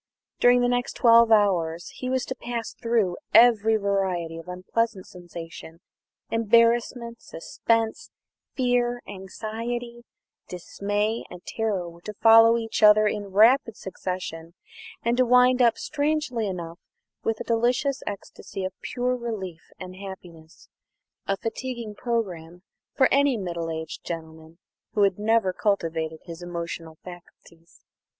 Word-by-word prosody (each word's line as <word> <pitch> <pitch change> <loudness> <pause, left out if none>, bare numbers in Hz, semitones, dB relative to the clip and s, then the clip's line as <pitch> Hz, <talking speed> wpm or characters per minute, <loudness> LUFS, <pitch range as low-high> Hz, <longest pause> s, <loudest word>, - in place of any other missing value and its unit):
During 245 0 +5
the 245 - +3
next 245 0 -1
twelve 230 -1 +5
hours 175 -6 +2
he 255 - -6
was 260 -1 0
to - - -4
pass 235 -2 -5
through 225 -7 0 0.2
every 225 -2 +6
variety 190 -5 -1
of 165 - -12
unpleasant 190 +3 -2
sensation. 170 -2 -10 0.5
Embarrassment, 235 +1 +2
suspense, 225 +6 -2 0.5
fear, 245 -1 0
anxiety, 230 +5 -6 0.4
dismay, 205 +5 -2
and 180 0 -12
terror 210 -6 -2
were 170 0 -13
to 210 +3 -8
follow 225 +1 +7
each 225 -1 -3
other 215 0 +7
in 210 -1 -1
rapid 225 +3 +4
succession, 180 -3 -6 0.5
and 235 +1 +1
to 255 - +4
wind 250 +1 +5
up, 235 -2 +4
strangely 290 -6 -1
enough, 170 -3 -6 0.4
with 225 -1 -1
a - - -3
delicious 245 +4 0
ecstasy 200 -1 -6
of 185 - -4
pure 250 0 -1
relief 205 -9 -6
and 185 0 -9
happiness 175 -5 -11 0.6
a 195 - 0
fatiguing 235 0 -5
programme 185 -7 -4 0.3
for 260 -2 +5
any 280 -2 +3
middle 170 -4 -4
aged 160 0 -6
gentleman 160 -1 -8 0.4
who 205 - +3
had 195 -1 +2
never 215 -3 +2
cultivated 165 -6 -1
his 170 -1 -9
emotional 170 -2 -6
faculties. 170 -1 -15
210 Hz, 130 wpm, -25 LUFS, 175-235 Hz, 0.6 s, follow